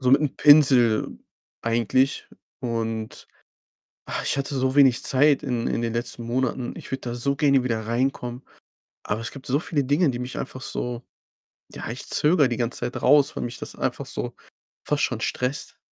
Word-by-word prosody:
So 125 -1 +2
mit'm 140 +1 +3
Pinsel 135 -7 +5 0.4
eigentlich. 120 +3 +1 0.3
Und, 115 -2 -4 0.8
ah, - - -3
ich - - 0
hatte 140 0 -2
so 130 +1 0
wenig 135 -4 +5
Zeit 145 +2 +3
in 125 -4 -2
in - - -1
den 115 -1 -2
letzten 120 0 -3
Monaten. 125 +1 -2
Ich - - -10
würde 135 0 -3
da 120 - -4
so 140 +3 0
gerne 140 -3 +3
wieder 110 -3 -2
reinkommen, 125 +1 -2 0.6
aber 105 +2 -2
es 120 - -4
gibt 135 - -11
so 135 +3 +2
viele 150 -2 -1
Dinge, 145 +3 +2
die 120 - -5
mich 125 +1 -5
einfach 130 -1 -5
so 120 -2 -4 0.7
ja, - - -7
ich 120 +4 -6
zögere 150 -2 +4
die 120 - -3
ganze 120 0 -2
Zeit 120 +1 -4
raus, 145 0 +4
weil - - -3
mich 120 - -6
das - - -6
einfach - - -2
so - - -4 0.5
fast - - 0
schon - - -1
stresst. 125 +3 -3
130 Hz, 180 wpm, -24 LUFS, 120-140 Hz, 0.8 s, Pinsel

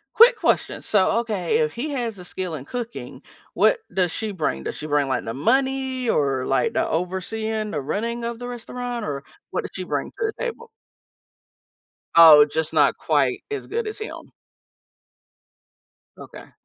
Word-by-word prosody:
Quick 475 +2 +8
question. 340 - 0
So, 200 -3 +3
okay, 205 -7 -1
if 155 -1 +1
he 285 +6 -3
has 240 -7 -3
a 180 - -10
skill 180 -2 -5
in 140 -3 -6
cooking, 240 +5 -6 0.3
what - - +4
does 180 -3 +1
she 220 +3 -4
bring? 150 - -2
Does - - -4
she 155 - -6
bring, 145 -2 +1
like, 130 -1 -1
the 115 - -4
money 260 - 0
or, 135 -6 +1
like, 135 -2 +1
the - - +1
overseeing 215 +5 -2
the 150 - -2
running 230 - -3
of 235 0 -4
the 245 - -6
restaurant, 245 -1 -5
or 140 -2 -4 0.3
what - - -2
does - - -7
she - - -4
bring - - -2
to - - -37
the 435 - -3
table? 470 -1 -5 1.5
Oh, 155 -3 +10
just 155 +1 -3
not 145 -3 +4
quite 145 -5 +1
as 425 - -4
good 455 0 -2
as 430 - -5
him. 435 - -8 1.9
Okay. - - -12
210 Hz, 170 wpm, -23 LUFS, 155-245 Hz, 1.9 s, Oh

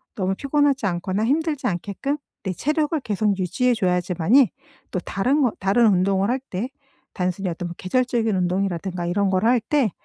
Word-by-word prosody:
너무 190 -1 0
피곤하지 280 -2 +1
않거나 185 +3 -1
힘들지 300 +3 0
않게끔 205 - -2 0.3
내 190 - -2
체력을 300 - 0
계속 210 -3 0
유지해 205 +8 +1
줘야지만이 180 +4 +3 0.4
또 185 - -1
다른 250 +11 0
거 245 - +3
다른 200 +5 +3
운동을 195 +1 +2
할 255 +2 +1
때 200 +7 -3 0.4
단순히 185 +1 -2
어떤 175 0 -5
계절적인 230 +1 0
운동이라든가 180 -1 -1
이런 195 +3 +1
걸 190 +2 +1
할 245 +1 +4
때 250 -2 +1
200 Hz, 360 characters per minute, -23 LUFS, 185-255 Hz, 0.4 s, 할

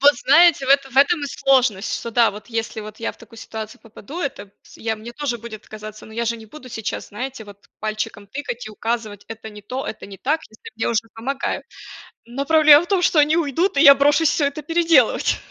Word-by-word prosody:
Вот 285 +1 +7
знаете, 290 +4 +5
в - - -4
этом 275 -1 +3
в 265 - -12
этом 295 +4 +5
и - - -3
сложность, 255 -8 +1
что 235 - -6
да, 235 -1 +4
вот 210 +1 -11
если 225 0 -3
вот 215 0 -10
я 230 - -2
в - - -18
такую 230 0 -16
ситуацию 220 -1 -8
попаду, 225 - -10
это 235 -9 -4
п 195 - -29
с - - -17
я 225 0 -2
мне 220 +2 -10
тоже 270 -3 -3
будет 220 -1 -10
казаться, 215 0 -10
но 220 - -13
я 235 +1 -2
же 235 0 -1
не 220 -1 -13
буду 255 +2 -12
сейчас, 220 -3 -5
знаете, 250 +3 -6
вот 205 -1 -16
пальчиком 215 -1 -4
тыкать 245 -1 -6
и 215 - -7
указывать: 220 -2 -4
"Это 220 -1 -9
не 210 0 -11
то, 255 +6 -5
это - - -7
не 200 -1 -10
так", 300 +10 -1
если 220 - -13
мне 225 - -1
уже 230 -2 +1
помогают. 265 +5 -3 0.6
Но 245 +4 -4
проблема 310 0 +7
в - - -10
том, 390 -3 +2
что 345 -2 +3
они 300 +3 +4
уйдут, 330 +2 0
и - - +5
я 280 -3 +9
брошусь 290 +3 +3
всё 290 - +1
это 280 +2 -3
переделывать. 330 -5 +3
240 Hz, 235 wpm, -21 LUFS, 220-285 Hz, 0.6 s, я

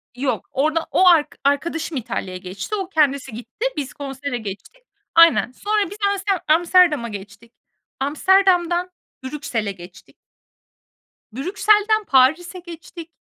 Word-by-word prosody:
Yok. 260 +1 -3
Orada 310 +4 0
o 370 - +4
ark 330 -4 +4
arkadaşım 310 +2 -1
İtalya'ya 185 -5 -4
geçti. 190 - -6
O, 385 -3 -4
kendisi 280 - +1
gitti. 240 - -6
Biz 280 -3 -4
konsere 275 -2 -5
geçtik. 220 - -9 0.3
Aynen. 330 -6 +5
Sonra 415 +6 -1
biz 410 - -10 0.2
amste 395 0 -2 0.2
Amsterdam'a 325 -5 +3
geçtik. 205 +3 -11 0.5
Amsterdam'dan 355 +4 +2 0.3
Brüksel'e 255 -7 -3
geçtik. 180 0 -14 1.2
Brüksel'den 420 - +1
Paris'e 315 +5 +2
geçtik. 335 -1 -11
305 Hz, 115 wpm, -21 LUFS, 255-360 Hz, 1.2 s, Aynen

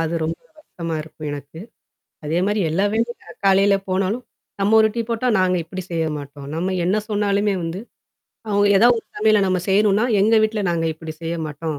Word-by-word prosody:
அது 165 +1 -1
ரொம்ப 165 +1 -3 0.2
வறுத்தமா 170 - -6
இருக்கும் 155 -1 -8
எனக்கு. 145 +3 -8 0.6
அதே 155 +3 0
மாரி 210 +1 0
எல்லா 185 +6 +1
வேலையும் 230 +2 -1 0.3
காலையில 195 +1 +5
போனாலும். 195 +6 -1 0.4
நம்ம 205 +3 +4
ஒரு 220 - +5
டீ 235 - -1
போட்டா 235 +2 -1
நாங்க 185 -1 +2
இப்படி 185 +3 -6
செய்ய 165 -1 0
மாட்டோம். 140 0 -10
நம்ம 185 +4 -1
என்ன 185 +4 +2
சொன்னாலுமே 205 -1 +1
வந்து, 165 +3 -4 0.7
அவுங்க 205 0 +3
ஏதாவது 240 +4 +5
உங்க - - -12
சமையல 215 -1 +4
நம்ம 185 -1 +1
செய்யணும்னா, 205 +3 +3
எங்க 215 +3 +4
வீட்ல 215 -1 -1
நாங்க 165 -1 0
இப்படி 160 0 -8
செய்ய 165 +1 -2
மாட்டோம். 150 0 -5
190 Hz, 180 wpm, -21 LUFS, 165-210 Hz, 0.7 s, காலையில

